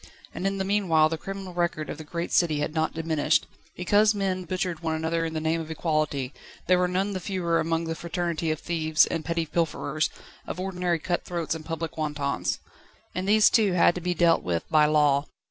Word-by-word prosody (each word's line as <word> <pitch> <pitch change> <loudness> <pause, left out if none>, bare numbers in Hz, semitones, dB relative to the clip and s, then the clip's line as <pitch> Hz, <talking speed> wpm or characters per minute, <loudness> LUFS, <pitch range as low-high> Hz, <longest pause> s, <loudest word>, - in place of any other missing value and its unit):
And 195 - -2
in 195 0 -1
the 190 - -1
meanwhile 180 -6 +3
the 160 - -2
criminal 195 0 -6
record 170 -3 -1
of 155 - -6
the - - -6
great 170 +3 -4
city 160 -4 +3
had 150 +1 -2
not 160 0 0
diminished. 160 -2 +1 0.3
Because 210 +4 +3
men 190 -2 -1
butchered 180 -1 -2
one 160 -2 -1
another 165 +1 -1
in 160 0 -4
the - - 0
name 160 +1 0
of 160 - -8
Equality, 155 -4 -1 0.3
there 180 0 +4
were 180 - +3
none 190 +3 -1
the 190 - -2
fewer 175 -2 0
among 165 +1 0
the 165 0 -2
Fraternity 170 -1 -2
of 155 -2 -1
thieves 160 -2 +2
and 165 -2 -3
petty 165 0 -1
pilferers, 155 -2 -1 0.4
of - - -5
ordinary 180 -2 -1
cut 175 +2 -2
throats 170 -3 -2
and 160 -1 -6
public 165 -1 -4
wantons. 145 -2 -1 0.6
And 185 +2 -2
these 215 0 +6
too 210 -5 +3
had 175 -1 +5
to 180 - -5
be 180 +1 -1
dealt 170 0 +4
with 85 -2 -2
by 150 -1 +5
law. 150 -2 +3
165 Hz, 210 wpm, -26 LUFS, 155-180 Hz, 0.6 s, these